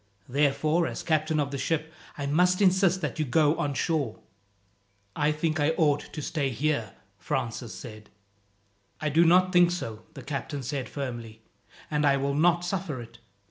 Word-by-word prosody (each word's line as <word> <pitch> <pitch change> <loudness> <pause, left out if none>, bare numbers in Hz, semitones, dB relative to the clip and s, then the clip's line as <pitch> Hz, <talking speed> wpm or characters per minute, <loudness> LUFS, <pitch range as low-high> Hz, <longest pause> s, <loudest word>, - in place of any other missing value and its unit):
Therefore, 150 +5 +2
as - - -5
captain 155 -1 +1
of 140 -1 -1
the 140 - -4
ship, 160 +1 -1 0.2
I 140 - -3
must 180 +5 +3
insist 190 -1 +3
that - - -3
you - - +2
go 150 +3 +3
on 145 -2 -1
shore." 145 -6 -1 1.0
"I 150 +1 +2
think 155 +1 -1
I 150 +2 +2
ought 145 -2 +1
to 150 - -5
stay 140 -3 -1
here," 135 -1 -1 0.3
Francis 120 0 -3
said. 110 -1 -10 0.9
"I 155 - -1
do 160 +4 +4
not 185 +2 +4
think 175 -1 +6
so," 115 -12 -4
the - - -9
captain 140 0 -4
said 135 +1 -3
firmly, 120 -5 -6 0.5
"and 150 0 +1
I 140 -1 +4
will 140 +1 -1
not 170 +4 +3
suffer 175 -7 -3
it. 120 0 -11
150 Hz, 170 wpm, -27 LUFS, 135-165 Hz, 1.0 s, think